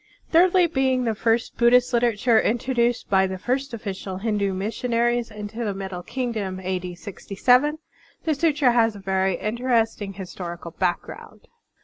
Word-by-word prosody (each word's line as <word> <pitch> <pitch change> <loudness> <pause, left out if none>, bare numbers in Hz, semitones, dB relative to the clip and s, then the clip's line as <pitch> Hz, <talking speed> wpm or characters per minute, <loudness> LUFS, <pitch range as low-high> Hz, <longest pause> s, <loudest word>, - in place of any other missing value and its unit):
Thirdly, 360 +2 +5
being 265 -5 +1
the 230 -2 0
first 225 +2 0
Buddhist 245 +1 +4
literature 235 -1 +3
introduced 240 0 0
by 190 -1 +3
the 190 0 -5
first 260 +7 -2
official 195 -4 -5
Hindu 205 -1 0
missionaries 235 +4 -1
into 210 +2 -6
the 205 -3 -2
Middle 190 -2 -5
Kingdom 215 -5 -3
(a. 185 0 -2
d. 180 -1 -7
67), 245 - +1 0.5
the 320 - +1
sutra 290 -4 +2
has 230 -2 +2
a - - -9
very 190 -1 0
interesting 225 -3 -1
historical 175 -3 -7
background. 175 +1 -4
225 Hz, 140 wpm, -23 LUFS, 195-245 Hz, 0.5 s, Thirdly